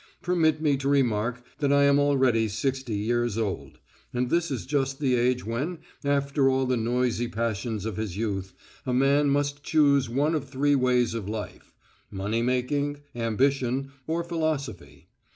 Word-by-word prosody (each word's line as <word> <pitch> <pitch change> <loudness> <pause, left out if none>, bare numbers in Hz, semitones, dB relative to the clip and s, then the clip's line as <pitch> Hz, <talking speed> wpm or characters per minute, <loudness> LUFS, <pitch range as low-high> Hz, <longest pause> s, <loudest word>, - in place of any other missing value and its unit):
Permit 160 -4 +2
me 150 -3 +2
to 135 +1 -2
remark 125 -3 +1 0.2
that 140 -2 +1
I 140 0 +5
am 140 0 +5
already 130 -6 +3
sixty 125 +2 -2
years 120 +1 0
old. 105 -4 -3 0.3
And 125 0 -1
this 170 0 +1
is 135 -4 -4
just 135 -1 -1
the 135 -3 +1
age 125 0 +1
when, 135 +11 -2 0.3
after 140 -1 +2
all 130 0 +1
the 130 0 +1
noisy 120 0 0
passions 110 -1 -3
of 110 -3 -4
his 105 -4 -4
youth, 100 -4 -3 0.3
a 125 - -1
man 140 +2 +3
must 145 0 0
choose 140 -4 +3
one 145 +6 +1
of 145 -4 -2
three 145 +2 +1
ways 125 -3 +2
of 110 -4 -4
life: 105 -1 -7 0.3
money 100 +4 -2
making, 140 +4 -1
ambition, 130 +3 0 0.2
or 165 +2 -1
philosophy. 140 - -3
130 Hz, 160 wpm, -26 LUFS, 115-140 Hz, 0.3 s, I